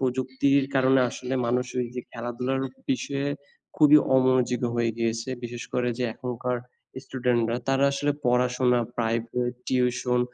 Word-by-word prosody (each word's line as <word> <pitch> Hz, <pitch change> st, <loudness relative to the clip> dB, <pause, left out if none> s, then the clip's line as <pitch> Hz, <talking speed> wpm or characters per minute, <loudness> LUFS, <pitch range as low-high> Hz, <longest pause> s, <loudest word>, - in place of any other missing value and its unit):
প্রযুক্তির 130 Hz, +2 st, +1 dB
কারণে 130 Hz, 0 st, +4 dB
আসলে 125 Hz, +2 st, -4 dB
মানুষ 125 Hz, +2 st, +1 dB, 0.2 s
এই 120 Hz, -, -4 dB
যে 125 Hz, -, -3 dB
খেলাধুলার 125 Hz, +2 st, -3 dB, 0.3 s
বিষয়ে 140 Hz, +1 st, -1 dB, 0.5 s
খুবই 150 Hz, -1 st, +7 dB, 0.2 s
অমনোযোগী 130 Hz, -1 st, +3 dB
হয়ে 120 Hz, -1 st, +2 dB
গিয়েছে। 115 Hz, +1 st, -1 dB, 0.2 s
বিশেষ 120 Hz, 0 st, -6 dB
করে 125 Hz, 0 st, 0 dB
যে 125 Hz, -, 0 dB
এখনকার 125 Hz, 0 st, -3 dB, 0.5 s
student 125 Hz, -2 st, 0 dB
রা 120 Hz, -, 0 dB
তারা 135 Hz, +1 st, +3 dB
আসলে 145 Hz, +1 st, 0 dB
পড়াশোনা, 125 Hz, 0 st, +2 dB, 0.2 s
private, 115 Hz, +2 st, -1 dB
tuition 125 Hz, -1 st, +1 dB
125 Hz, 135 wpm, -26 LUFS, 120-130 Hz, 0.5 s, খুবই